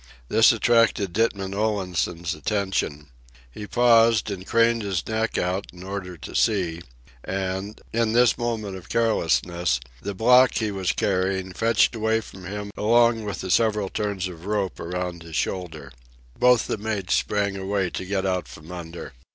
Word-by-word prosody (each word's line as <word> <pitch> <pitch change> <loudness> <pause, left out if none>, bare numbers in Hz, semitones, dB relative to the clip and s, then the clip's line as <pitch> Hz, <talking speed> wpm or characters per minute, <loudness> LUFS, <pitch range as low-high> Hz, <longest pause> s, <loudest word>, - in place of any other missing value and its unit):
This 115 - +6
attracted 115 -5 +2
Ditman 100 -3 0
Olansen's 90 -5 -1
attention. 95 -9 -2 0.4
He 105 +11 -8
paused 115 -3 +4
and 95 -1 -6
craned 115 0 +3
his 95 -5 -2
neck 110 0 -1
out 90 +2 -1
in 90 0 -12
order 95 -2 -6
to - - -9
see, 90 -6 +1 0.4
and, 95 +2 -3
in 115 -1 +1
this 120 0 +5
moment 110 -5 -3
of 90 - -13
carelessness, 90 - +1 0.2
the 100 -1 -5
block 125 +5 +5
he 110 -2 0
was 95 -2 -1
carrying 95 -2 -1
fetched 115 +2 +2
away 110 0 +1
from 95 -4 -11
him 100 +2 -5
along 115 0 +3
with 100 -5 -4
the 95 - -4
several 105 -2 +2
turns 100 -3 -2
of 90 0 -10
rope 105 -3 -1
around 90 0 -4
his 80 -1 -9
shoulder. 80 -7 -3 0.4
Both 125 -2 +4
the - - -3
mates 105 -3 -2
sprang 100 -1 0
away 95 -1 -1
to - - -4
get 95 +1 -2
out 90 -1 -1
from 80 +2 -12
under. 85 -1 -8
100 Hz, 160 wpm, -24 LUFS, 90-110 Hz, 0.4 s, This